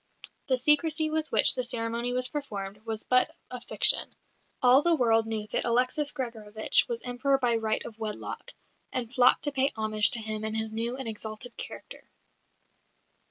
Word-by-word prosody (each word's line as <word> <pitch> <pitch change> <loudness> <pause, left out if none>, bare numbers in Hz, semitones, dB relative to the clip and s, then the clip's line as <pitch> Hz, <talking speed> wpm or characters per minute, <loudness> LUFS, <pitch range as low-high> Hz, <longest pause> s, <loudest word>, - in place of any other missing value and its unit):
The 260 -2 +2
secrecy 305 +3 +1
with 315 0 -2
which - - +4
the 255 - -3
ceremony 235 0 -3
was 250 0 +1
performed 210 -9 -6
was 220 -1 -3
but 255 0 +1 0.2
a 250 -1 -7
fiction. - - +2 0.4
All 255 +1 +6
the 340 +1 +3
world 225 -5 +2
knew 220 -1 -2
that - - 0
Alexis 255 +5 +1
Gregorovitch 220 -4 0
was 475 -1 -4
Emperor 260 +3 0
by 245 -3 +1
right 220 -1 -2
of 225 -1 -10
wedlock, 215 -1 -6 0.4
and 245 -1 -3
flocked 250 -1 +4
to 290 - +2
pay 270 0 +2
homage 215 -1 +3
to 240 - +1
him 215 -1 -4
in 220 0 -2
his 220 0 +2
new 230 +3 -1
and 265 -3 -5
exalted 220 +2 -3
character. - - -8
240 Hz, 170 wpm, -27 LUFS, 220-265 Hz, 0.4 s, All